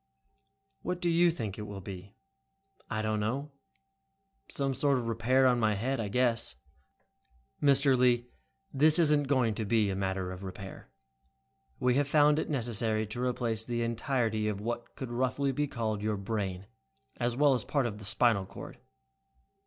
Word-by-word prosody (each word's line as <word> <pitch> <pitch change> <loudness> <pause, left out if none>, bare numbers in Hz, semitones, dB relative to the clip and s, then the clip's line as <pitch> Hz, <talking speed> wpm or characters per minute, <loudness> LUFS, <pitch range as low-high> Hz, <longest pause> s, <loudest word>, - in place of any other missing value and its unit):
"What 180 - -3
do 175 -1 +1
you 170 +1 +5
think 110 - -4
it 105 - -6
will 100 -1 -7
be?" 95 +2 -9 0.7
"I 110 0 -2
don't 110 0 0
know. 135 +8 -2 1.0
Some 135 -1 0
sort 140 0 +2
of 120 -2 -3
repair 120 +4 +2
on 125 -1 +4
my 110 -2 +2
head, 130 +6 -1
I 110 - -2
guess." 115 - 0 1.1
"Mr. 140 -1 +4
Lee, 125 -1 +3 0.5
this 150 +4 +5
isn't 150 -4 +3
going 130 -5 +2
to 110 - -3
be 105 -1 +2
a - - -2
matter 95 -1 -2
of 90 0 -8
repair. 95 0 -9 0.9
We 125 0 +2
have 145 - -2
found 150 0 +4
it - - -3
necessary 115 -5 0
to 110 +4 -5
replace 120 -3 -1
the 120 0 -2
entirety 115 -2 -1
of 105 -2 -2
what 120 +2 -5
could 130 -3 -6
roughly 130 +3 0
be 145 +3 -1
called 110 -5 -3
your 105 0 -1
'brain', 100 -2 -3 0.5
as 120 0 -1
well 145 -1 +5
as 125 -4 -1
part 140 +2 0
of 105 -3 -4
the 105 - -9
spinal 100 -1 +2
cord." - - -10
120 Hz, 170 wpm, -30 LUFS, 105-135 Hz, 1.1 s, you